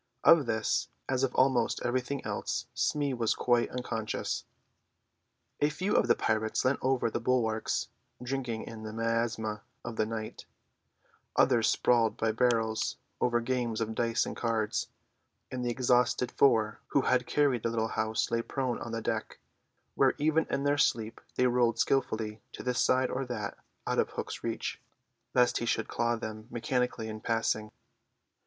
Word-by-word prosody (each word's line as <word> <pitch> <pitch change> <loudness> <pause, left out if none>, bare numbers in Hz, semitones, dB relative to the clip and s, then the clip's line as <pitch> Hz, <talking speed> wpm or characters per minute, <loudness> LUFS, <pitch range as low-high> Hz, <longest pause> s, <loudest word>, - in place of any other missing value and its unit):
Of 155 -6 +7
this, 110 -1 0 0.2
as 130 -1 0
of 135 - 0
almost 130 -3 +3
everything 130 +3 -1
else, - - -2
Smee 145 -2 0
was 115 -3 +1
quite 120 -1 +2
unconscious. 115 -3 -3 1.1
A 145 - +3
few 185 +7 -1
of - - +4
the - - +5
pirates 110 +1 0
leant 130 +2 +2
over 130 -3 +1
the - - -1
bulwarks, 110 -4 0 0.3
drinking 125 -2 -3
in 115 -1 -8
the 110 0 -6
miasma 115 -2 -1 0.2
of 120 -2 -5
the 110 - +1
night; 110 -1 -5 0.9
others 120 -4 +4
sprawled 115 -3 +3
by 110 0 +1
barrels 115 -1 +1 0.2
over 120 -1 +2
games 120 -2 -1
of 110 -1 -2
dice 115 0 +1
and - - -5
cards; 110 -3 -1 0.6
and 130 -1 -3
the 120 - 0
exhausted 125 0 +2
four 110 -6 +3
who 140 - +2
had 125 -1 +2
carried 140 -5 +2
the 115 - 0
little 115 -1 -1
house 110 0 -1
lay 115 0 +2
prone 130 0 -2
on 115 - -6
the 115 -1 -3
deck, - - -2 0.6
where 135 -1 +3
even 155 +2 +2
in 140 0 -1
their 145 0 +2
sleep 115 -4 +1
they 125 - +3
rolled 120 -2 +3
skillfully 110 -4 0
to - - -7
this 125 -1 0
side 130 0 +2
or 135 - -1
that 115 -5 -4 0.3
out - - 0
of - - +2
Hook's - - -5
reach, - - -3 0.5
lest 125 -1 +4
he 120 - -3
should - - 0
claw 120 0 0
them 110 -1 -6
mechanically 125 -1 -1
in 110 0 -6
passing. 115 -1 0
120 Hz, 160 wpm, -30 LUFS, 110-130 Hz, 1.1 s, Of